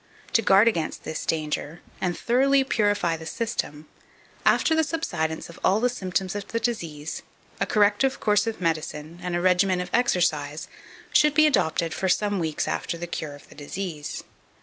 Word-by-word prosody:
To 225 - +5
guard 200 +2 +5
against 165 -9 -1
this 155 - -5
danger, 155 0 -2 0.2
and 175 -2 -1
thoroughly 270 +3 +3
purify 205 -9 +1
the 160 0 -9
system, 155 -6 -3 0.6
after 320 - +4
the 320 0 +3
subsidence 160 - -2
of 170 - -13
all 195 +3 +4
the 250 +2 +2
symptoms 190 -5 -2
of 205 -1 -5
the 230 - -2
disease, 165 -10 -3 0.4
a - - 0
corrective 210 +5 +2
course 210 +1 +2
of 225 - -3
medicine, 160 -1 -3
and 180 -1 -2
a 175 - 0
regimen 185 0 +3
of 180 0 -4
exercise, 160 -10 +1 0.5
should 300 -1 +5
be 310 0 +6
adopted 170 - +1
for 190 - -1
some 205 +1 +1
weeks 160 -3 -1
after 170 - -2
the 175 - -5
cure 155 -4 -5
of 145 - -16
the - - -13
disease. 150 +1 -5
180 Hz, 170 wpm, -25 LUFS, 160-225 Hz, 0.6 s, be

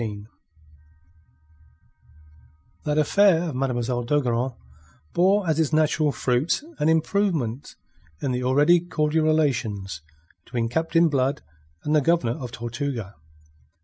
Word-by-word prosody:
THE 115 - -1
TRAP 105 +2 -13 2.5
That 150 0 0
affair 175 +3 +4
of 145 - -6
Mademoiselle 125 -2 -1
d'Ogeron 125 -2 0 0.6
bore 190 +2 +3
as 160 -1 +1
its 160 -2 +1
natural 155 -1 +2
fruit 130 - 0 0.2
an 150 - +2
improvement 160 - 0 0.4
in 135 - -2
the 125 0 -2
already 145 +7 +4
cordial 160 -2 0
relations 110 - 0 0.4
between 115 +1 -3
Captain 165 +5 +2
Blood 140 -1 0 0.4
and 150 - +1
the 150 - +4
Governor 140 -7 +1
of 125 -3 -6
Tortuga. 120 -3 -5
145 Hz, 115 wpm, -24 LUFS, 120-160 Hz, 2.5 s, affair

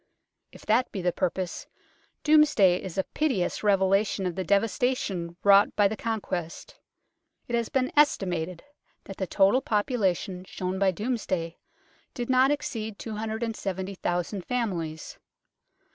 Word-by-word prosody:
If - - -15
that 230 +4 +2
be 190 - -5
the 180 - +2
pur 185 +1 0
pose, 180 0 -5 0.6
Domesday 295 -13 +5
is 185 -2 -7
a 190 - +2
pitiless 255 -12 -1
revelation 195 0 +2
of 180 - -1
the 190 - -3
devastation 200 -4 0
wrought 200 0 +5
by 205 -1 +4
the 215 - -3
Conquest. 195 -7 -4 0.7
It 240 - -6
has 235 -1 0
been 260 -1 0
estimated 180 - +1 0.4
that 195 - -9
the 190 - -2
total 200 +8 +3
population 205 - -1
shown 185 0 -4
by 195 -1 +4
Domesday 185 -5 -3 0.6
did 245 +1 -2
not 260 +1 +5
exceed 220 -7 -3
270,000 205 -4 -3
families. 175 -11 -3
200 Hz, 130 wpm, -27 LUFS, 185-230 Hz, 0.7 s, Domesday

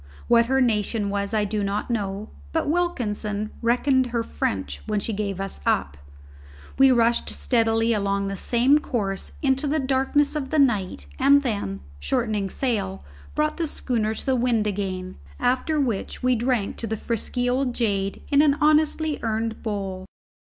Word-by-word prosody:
What 235 -1 +5
her 265 +1 +2
nation 210 -3 +1
was 200 0 -2
I 215 -1 +1
did 205 0 -2
not 200 +4 -2
know; 205 -2 -3 0.2
but - - 0
Wilkinson 215 -11 -1
reckoned 255 +2 +2
her 235 -1 -1
French 70 - -3
when 210 - 0
she 220 +2 -3
gave 200 -2 -3
us 195 - -4
up. 70 0 +1 0.8
We 270 0 +7
rushed 235 -2 +3
steadily 225 -1 +2
along 200 -1 0
the 195 - -3
same 250 +8 +3
course 200 -9 -3
into 270 +1 +2
the 300 +2 +1
darkness 270 +2 +1
of 275 -3 -3
the 310 - 0
night 205 - +1
and 280 +1 +5
then, 200 - -2 0.2
shortening 200 - -1
sail, 200 -6 -2 0.3
brought 305 0 0
the 335 -2 0
schooner 225 -6 -1
to - - -4
the 265 - +2
wind 235 -3 +1
again, 190 -2 -3 0.2
after 260 +5 +1
which 240 -6 -2
we 255 0 +4
drank 235 -3 0
to 230 - -3
the 220 +1 -2
frisky 245 +3 -2
old 250 0 0
jade 200 -4 -1
in 285 0 +6
an 290 -2 +4
honestly 310 0 +2
earned 225 0 -2
bowl. 195 -3 -4
230 Hz, 165 wpm, -24 LUFS, 200-265 Hz, 0.8 s, We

